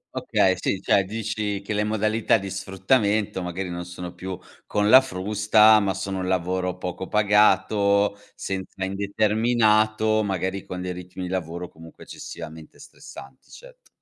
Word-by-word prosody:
Okay, 95 Hz, -1 st, +2 dB
sì, 95 Hz, -, -1 dB
cioè 100 Hz, +1 st, +2 dB
dici 105 Hz, -1 st, -3 dB
che 105 Hz, -, -4 dB
le 105 Hz, 0 st, 0 dB
modalità 110 Hz, +1 st, +1 dB
di 100 Hz, -2 st, -6 dB
sfruttamento 100 Hz, +1 st, 0 dB
magari 90 Hz, +1 st, -4 dB
non 85 Hz, 0 st, -5 dB
sono 90 Hz, 0 st, -8 dB
più 95 Hz, 0 st, -6 dB, 0.3 s
con 105 Hz, 0 st, 0 dB
la 130 Hz, +5 st, +9 dB
frusta, 105 Hz, -1 st, +4 dB
ma 100 Hz, -2 st, -1 dB
sono 95 Hz, 0 st, -4 dB
un 90 Hz, -, -3 dB
lavoro 90 Hz, 0 st, -1 dB
poco 90 Hz, +1 st, -5 dB
pagato, 105 Hz, -1 st, +3 dB, 0.2 s
senza 95 Hz, 0 st, -5 dB
indeterminato, 110 Hz, +2 st, +1 dB
magari 95 Hz, -1 st, -3 dB
con 90 Hz, 0 st, -6 dB
dei 90 Hz, 0 st, -4 dB
ritmi 90 Hz, +1 st, -8 dB
di 90 Hz, -, -4 dB
lavoro 90 Hz, -1 st, -4 dB
comunque 80 Hz, 0 st, -15 dB
eccessivamente 80 Hz, 0 st, -10 dB
stressanti, 65 Hz, -1 st, -14 dB
cet -, -, -16 dB
100 Hz, 145 wpm, -24 LUFS, 90-105 Hz, 0.3 s, la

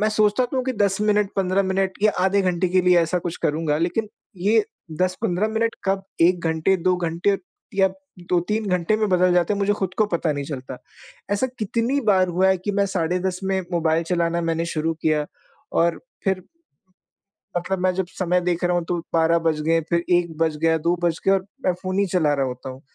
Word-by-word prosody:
मैं 215 Hz, -, +3 dB
सोचता 215 Hz, +3 st, +2 dB
तो 260 Hz, -, -5 dB
हूँ 255 Hz, -, 0 dB
कि 260 Hz, -, -1 dB
10 200 Hz, -3 st, +1 dB
मिनट, 210 Hz, -1 st, +2 dB
15 190 Hz, +1 st, +2 dB
मिनट 190 Hz, 0 st, 0 dB
या 215 Hz, -1 st, +4 dB
आधे 195 Hz, +1 st, +3 dB
घंटे 180 Hz, 0 st, +1 dB
के 185 Hz, +1 st, +3 dB
लिए 180 Hz, -1 st, +5 dB
ऐसा 170 Hz, +2 st, +1 dB
कुछ 175 Hz, 0 st, -4 dB
करूँगा 150 Hz, 0 st, 0 dB
लेकिन 205 Hz, +6 st, -1 dB, 0.3 s
ये 205 Hz, +4 st, +3 dB, 0.4 s
10-15 185 Hz, +2 st, 0 dB
मिनट 225 Hz, +1 st, 0 dB
कब 195 Hz, 0 st, 0 dB, 0.2 s
1 175 Hz, +1 st, +4 dB
घंटे, 160 Hz, +4 st, +2 dB
2 180 Hz, +1 st, +1 dB
घंटे 175 Hz, +3 st, 0 dB, 0.4 s
या 195 Hz, -1 st, +4 dB, 0.4 s
2-3 210 Hz, +5 st, 0 dB
घंटे 180 Hz, +3 st, +1 dB
में 215 Hz, -1 st, 0 dB
बदल 180 Hz, -1 st, +3 dB
जाते 175 Hz, +3 st, +2 dB
हैं 205 Hz, -, -1 dB
मुझे 200 Hz, +1 st, +2 dB
खुद 190 Hz, -3 st, -3 dB
को 215 Hz, -, +5 dB
पता 165 Hz, -2 st, +1 dB
नहीं 145 Hz, -1 st, -4 dB
चलता। 130 Hz, -3 st, -6 dB, 0.5 s
ऐसा 205 Hz, +6 st, +1 dB
कितनी 230 Hz, +6 st, 0 dB
बार 195 Hz, -6 st, +3 dB
हुआ 185 Hz, +2 st, +2 dB
है 190 Hz, -, +4 dB
कि 205 Hz, +3 st, -3 dB
मैं 200 Hz, 0 st, +2 dB
साढ़े 180 Hz, -2 st, -1 dB
10 185 Hz, 0 st, -2 dB
में 190 Hz, 0 st, 0 dB
मोबाइल 165 Hz, -1 st, +1 dB
चलाना 170 Hz, 0 st, 0 dB
मैंने 165 Hz, 0 st, -1 dB
शुरू 165 Hz, 0 st, -1 dB
किया 150 Hz, -2 st, +1 dB, 0.5 s
और 170 Hz, 0 st, +1 dB, 0.2 s
फिर 190 Hz, -2 st, 0 dB, 1.2 s
मतलब 185 Hz, +2 st, -2 dB
मैं 185 Hz, 0 st, +2 dB
जब 190 Hz, -1 st, 0 dB
समय 180 Hz, 0 st, +2 dB
देख 175 Hz, 0 st, -1 dB
रहा 175 Hz, 0 st, +2 dB
हूँ 175 Hz, -, -1 dB
तो 175 Hz, -, 0 dB, 0.2 s
12 165 Hz, 0 st, +3 dB
बज 155 Hz, -1 st, 0 dB
गए 165 Hz, +1 st, +2 dB
फिर 170 Hz, -1 st, +1 dB
1 170 Hz, -2 st, 0 dB
बज 160 Hz, -2 st, +1 dB
गया, 165 Hz, 0 st, +3 dB
2 170 Hz, +3 st, +1 dB
बज 170 Hz, -2 st, +1 dB
गए 195 Hz, -, +5 dB
और 190 Hz, -1 st, +2 dB, 0.2 s
मैं 185 Hz, -, +3 dB
फ़ोन 185 Hz, +1 st, -2 dB
ही 200 Hz, -, +3 dB
चला 155 Hz, -5 st, +3 dB
रहा 135 Hz, -1 st, 0 dB
होता 125 Hz, +1 st, -6 dB
हूँ। 130 Hz, +1 st, -10 dB
180 Hz, 215 wpm, -23 LUFS, 165-195 Hz, 1.2 s, लिए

